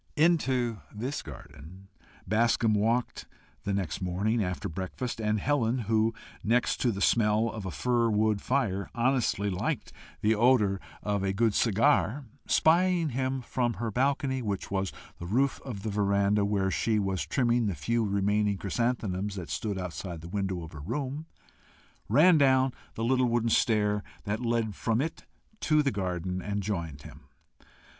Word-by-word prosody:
Into 135 - +2
this 125 +7 -4
garden, 80 +7 -12 0.4
Bascombe 115 +2 +2
walked 115 +4 0 0.4
the 100 - 0
next 95 -4 -2
morning, 100 +5 0
after 90 -1 -3
breakfast, 95 +8 -4
and 105 0 +1
Helen, 130 -2 +1
who, 110 -1 +1 0.3
next 120 +3 +2
to 120 - +1
the 100 -2 -5
smell 110 +1 +3
of 110 -4 -6
a - - -2
fir 120 +5 +1
wood 105 -1 +1
fire, 110 -8 -1
honestly 120 -4 +1
liked 90 - -3 0.3
the 110 +1 +3
odour 110 -4 +3 0.2
of 105 -1 0
a 95 0 0
good 110 +1 +2
cigar, 125 +5 +2 0.2
spying 170 0 +3
him 130 0 -2
from 120 -1 -1
her 115 -2 -3
balcony, 130 +2 0
which 100 -5 -3
was 95 -1 -1 0.3
the 85 - -6
roof 135 +8 +1
of 105 -7 -6
the 110 - -2
veranda, 100 0 +2
where 100 -2 0
she 110 +3 +1
was 95 -2 -1
trimming 120 -3 +1
the 95 - -1
few 115 +11 0
remaining 100 0 +1
chrysanthemums 105 -2 -1
that 85 -7 -6
stood 100 +3 -2
outside 90 -2 -5
the 85 - -9
window 95 -2 -2
of 80 - -9
her 75 - -9
room, 135 - -4 0.8
ran 160 +2 +6
down 130 -2 +4 0.2
the 115 - -3
little 130 +1 +3
wooden 115 -1 +1
stair 105 -3 +2 0.2
that 105 +3 -2
led 115 -3 0
from 115 +3 0
it 160 +4 -3 0.3
to 155 -5 +3
the 140 - +1
garden, 90 -2 -3
and 100 +1 -3
joined 85 -8 -4
him. 75 -3 -13
110 Hz, 160 wpm, -28 LUFS, 100-125 Hz, 0.8 s, ran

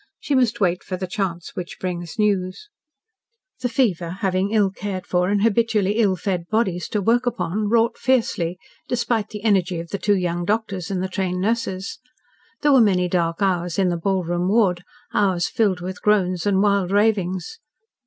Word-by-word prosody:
She 290 - -2
must 245 -3 +2
wait 180 -3 +1
for 185 - -4
the 185 - -3
chance 180 -2 -4
which 180 -1 -6
brings 175 -3 -4
news...... 205 - 0 0.9
The 250 -1 -1
fever, 190 -10 +1
having 190 0 +1
ill 205 -3 +2
cared 195 -1 -5
for 180 -1 +1
and 205 0 +1
habitually 220 -2 +2
ill 200 -4 +3
fed 180 -2 -3
bodies 195 -6 0
to 210 - -1
work 240 +4 +2
upon, 210 -2 -1
wrought 230 +1 +2
fiercely, 205 -9 +1 0.3
despite 235 -3 -1
the 210 -1 -8
energy 190 -5 +2
of 170 0 -7
the 200 - -3
two 205 0 +2
young 175 -1 -1
doctors 200 -3 -2
and 185 -2 -2
the - - -1
trained 185 -1 -2
nurses. 195 -1 -2 0.6
There 295 -1 +5
were 265 - +7
many 185 -4 +3
dark 170 +1 0
hours 180 -3 0
in 190 -2 +3
the 175 - 0
ballroom 175 0 -1
ward, 195 -5 +2 0.3
hours 185 -4 +2
filled 205 -7 0
with 185 +1 -6
groans 185 -4 +1
and 195 -1 +3
wild 200 -3 +2
ravings. 195 -4 0
195 Hz, 175 wpm, -22 LUFS, 180-215 Hz, 0.9 s, were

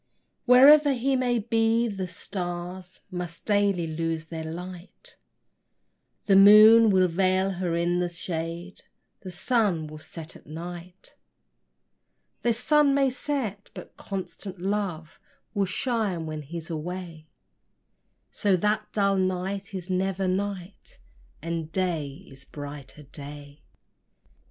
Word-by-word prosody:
Wherever 280 +3 +7
he 265 +2 0
may 250 -2 +1
be, 225 +1 +1
the 195 -4 -4
stars 180 0 -6
Must 175 -2 -6
daily 200 -4 +2
lose 165 0 -3
their 160 0 -6
light; 175 +3 -9 1.1
The 195 - +4
moon 215 +3 +9
will 185 -2 +4
veil 185 +2 +1
her 180 -2 -2
in 175 +1 +1
the 175 -1 0
shade; 170 +1 -5 0.4
The 190 - -9
sun 185 -3 0
will 155 0 -9
set 160 0 -9
at - - -16
night. 175 +3 -9 1.3
The 240 - +2
sun 280 +4 +3
may 275 -2 +3
set, 245 -7 -4
but - - -10
constant 195 -1 -6
love 185 -5 -3 0.3
Will 200 -2 +1
shine 205 -6 -1
when 155 -1 -5
he's 165 +3 -8
away; 165 0 -6 1.0
So 200 -3 +1
that 210 +3 -1
dull 200 -1 +2
night 190 +1 -2
is 185 0 -5
never 190 +1 0
night, 190 0 -4 0.5
And 165 -1 -4
day 165 -2 -2
is 135 +1 -12
brighter 145 0 -9
day. 145 +1 -9
185 Hz, 120 wpm, -26 LUFS, 165-205 Hz, 1.3 s, moon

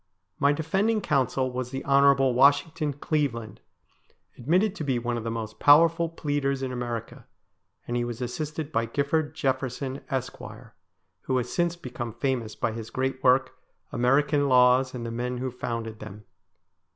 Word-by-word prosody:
My 140 0 +4
defending 190 +9 +1
counsel 130 - 0
was 125 0 -4
the 135 +1 -6
Hon. 140 -1 +4
Washington 145 +3 +3
Cleveland, 135 -7 -2 0.7
admitted 180 - +1
to 185 - -6
be 135 -4 0
one 120 0 -2
of 115 - -4
the 115 - -3
most 110 -1 -5
powerful 165 +3 +5
pleaders 145 -4 -2
in 130 - -3
America, 120 -2 -5 0.6
and 120 - -2
he 120 - 0
was 120 -1 -5
assisted 150 +5 -4
by 115 -4 0
Gifford 145 +4 -1
Jefferson, 135 -1 -2
Esq., 130 -1 -3 0.8
who 130 - -1
has 125 -1 -3
since 175 -1 +1
become 125 -7 -6
famous 120 -2 -2
by 115 - -1
his 115 0 -7
great 130 0 -2
work, 130 +1 +4 0.2
' - - -45
American 140 +4 +2
Laws, 125 +1 +4
and 120 -2 -5
the 115 - -4
Men 125 +2 -3
who 130 +1 -3
Founded 115 -3 -5
Them. 105 0 -10
130 Hz, 160 wpm, -26 LUFS, 120-145 Hz, 0.8 s, powerful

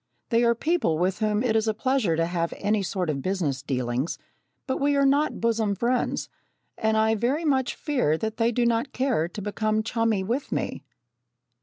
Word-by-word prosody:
They 235 0 +3
are 235 0 +4
people 305 - +1
with 180 +2 0
whom 215 +1 +1
it 230 -3 +1
is 220 0 +2
a 220 - +1
pleasure 255 -8 +1
to 165 +1 +1
have 170 -1 -2
any 205 +1 +1
sort 185 -1 -2
of 140 -2 -3
business 165 -8 -1
dealings, 130 +1 -2 0.5
but 260 - -1
we 285 0 +3
are 280 0 +3
not 285 +3 +2
bosom 220 -3 +1
friends 240 +4 0 0.5
and 220 -1 +1
I 220 0 +3
very 250 +9 0
much 265 -4 +1
fear 250 - 0
that 220 +4 -3
they 230 0 +2
do 240 +1 +1
not 235 +3 0
care 255 - +1
to 205 - -8
become 215 +1 0
chummy 225 -3 0
with 240 +8 -2
me. - - -3
220 Hz, 190 wpm, -25 LUFS, 185-250 Hz, 0.5 s, are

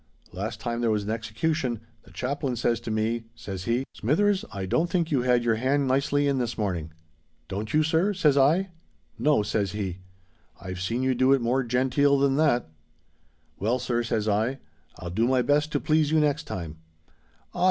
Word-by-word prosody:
Last 110 +4 -4
time 120 +1 -3
there 120 - +2
was 105 -2 +1
an 105 - -3
execution, 115 +3 -2 0.3
the - - -17
Chaplain 135 0 -2
says 115 0 0
to 115 - -7
me, 110 +1 -1
says 95 -5 -7
he, 120 +3 0
'Smithers, 195 - +1
I 100 -2 -4
don't 160 - +1
think 170 -3 0
you 135 -4 +2
had 125 -1 +2
your 115 -2 +2
hand 135 +3 +1
nicely 140 +2 +1
in 140 -2 +1
this 120 -1 -2
morning?'—'Don't 80 +1 -6
you, 155 +1 +3
sir?' 160 +6 +2
says 150 -6 +3
I.—'No,' 150 - 0
says 100 -2 -1
he; 95 -4 -4 0.6
'I've 95 0 -6
seen 115 +7 -1
you 130 0 +2
do 130 +2 +4
it 135 - +3
more 125 +3 +1
genteel 130 +4 +2
than 135 -1 +2
that.'—'Well, 80 - -3
sir,' 120 -1 -1
says 110 -2 -1
I, 110 +6 +1 0.4
'I'll 90 -1 -6
do 110 +6 +1
my 130 -1 +2
best 150 +2 +2
to 145 - +2
please 155 0 +2
you 155 0 +3
next 150 -1 +1
time.'—'_Ah! 80 - -11
120 Hz, 175 wpm, -26 LUFS, 105-140 Hz, 0.6 s, do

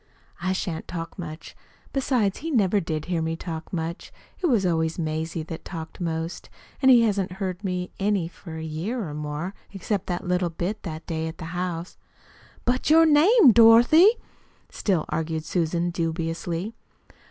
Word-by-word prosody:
"I 185 +1 0
shan't 175 -3 -3
talk 165 +1 -6
much. 160 -2 -8 0.4
Besides, 250 -7 +1
he 325 - -4
never 210 - +3
did 155 -3 -3
hear 175 -2 -1
me 160 0 -1
talk 165 -1 -6
much. 170 0 -4 0.3
It 360 - +2
was 230 - +2
always 160 -2 0
Mazie 160 0 -2
that 165 +1 -7
talked 165 -1 -8
most. 165 0 -3 0.3
And 265 - +5
he 245 -3 +7
hasn't 200 -4 0
heard 190 0 -4
me 180 -2 -2
any 195 -4 +1
for 165 -1 -10
a 160 - -5
year 175 +8 -3
or 150 - -6
more, 150 +5 -4 0.2
except 200 0 -3
that 180 0 -3
little 180 -1 +1
bit 180 +6 -3
that 160 -3 -7
day 160 -1 -2
at 160 - -7
the 170 - -7
house." 175 -1 -4 0.7
"But 250 +3 +1
your 325 +1 +7
name, 315 - +7
Dorothy," 235 - +7 0.6
still 185 -7 0
argued 160 -1 -2
Susan 170 0 0
dubiously. 165 +3 -3
175 Hz, 165 wpm, -25 LUFS, 160-205 Hz, 0.7 s, he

